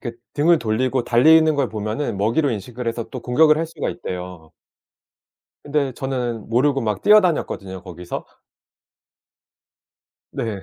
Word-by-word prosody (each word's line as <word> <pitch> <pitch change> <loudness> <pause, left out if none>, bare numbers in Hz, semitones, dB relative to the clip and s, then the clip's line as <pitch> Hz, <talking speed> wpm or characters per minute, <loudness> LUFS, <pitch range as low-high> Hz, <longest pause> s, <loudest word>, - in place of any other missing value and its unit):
그 120 -3 -5 0.2
등을 160 +3 +4
돌리고 120 +2 0
달리는 155 +6 +5
걸 140 -4 0
보면은 110 +3 -3
먹이로 115 +9 +1
인식을 120 +3 -6
해서 115 0 -3
또 130 - -6
공격을 150 +6 +4
할 165 - -1
수가 160 -2 -4
있대요. 90 - -7 1.1
근데 145 -2 -1
저는 125 -5 -4
모르고 135 +4 +2
막 105 -2 -2
뛰어다녔거든요 160 - +2
거기서. 90 -2 -7 2.1
네. 105 -4 -4
125 Hz, 280 characters per minute, -21 LUFS, 110-145 Hz, 2.1 s, 달리는